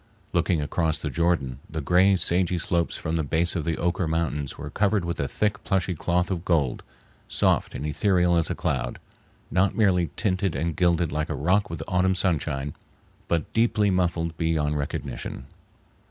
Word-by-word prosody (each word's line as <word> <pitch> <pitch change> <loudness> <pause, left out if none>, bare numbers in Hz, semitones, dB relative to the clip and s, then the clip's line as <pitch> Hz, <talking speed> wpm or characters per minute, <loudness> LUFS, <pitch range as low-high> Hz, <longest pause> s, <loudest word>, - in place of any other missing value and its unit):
Looking 80 -4 +1
across 80 +1 0
the - - -4
Jordan, 80 -7 0
the 80 - -4
gray 90 +7 +4
sagey 90 0 +1
slopes 85 0 0
from 80 +1 -2
the 80 - 0
base 80 +5 +1
of 85 - -2
the 85 -1 0
Oquirrh 85 -1 0
Mountains 80 -4 -1
were 75 0 -7
covered 100 -1 +1
with 85 -1 -3
a 70 - 0
thick, 105 +6 -1
plushy 95 -2 0
cloth 90 +3 0
of 85 -3 -2
gold, 75 -9 +1 0.5
soft - - +1
and 70 - -4
ethereal 90 +3 +2
as 85 -1 +2
a - - -1
cloud, 65 - -2 0.5
not 95 +1 +2
merely 90 -6 +3
tinted 95 -3 0
and 85 -1 -1
gilded 85 -2 +2
like 75 +1 -2
a - - -2
rock 90 +7 +1
with 80 -1 -5
autumn 95 +1 +2
sunshine, 75 -6 -1 0.5
but 85 -3 -1
deeply 110 -3 +2
muffled 85 -3 0
beyond 80 -3 0
recognition. 70 -3 -4
85 Hz, 170 wpm, -25 LUFS, 75-90 Hz, 0.5 s, gray